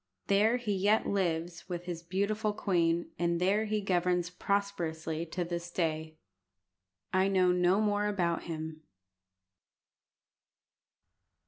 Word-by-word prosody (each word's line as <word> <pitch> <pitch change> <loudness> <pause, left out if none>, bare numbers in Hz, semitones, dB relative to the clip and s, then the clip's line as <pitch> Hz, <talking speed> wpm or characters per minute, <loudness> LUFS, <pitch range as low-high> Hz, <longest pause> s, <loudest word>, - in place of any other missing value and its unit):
There 210 +4 +3
he 230 -4 -2
yet 205 +3 +3
lives 170 -3 -1
with 175 0 -4
his 175 -2 -4
beautiful 200 +4 -1
queen, 170 -4 +1
and 170 0 +1
there 200 +4 +2
he 215 0 -1
governs 180 -2 +1
prosperously 170 -5 -2
to 175 +2 -2
this 170 0 -4
day. 160 -2 -2 1.0
I 185 +1 +4
know 185 -2 +3
no 180 +2 +3
more 210 -1 +1
about 175 -5 0
him. 160 -1 -5
180 Hz, 115 wpm, -31 LUFS, 170-200 Hz, 1.0 s, I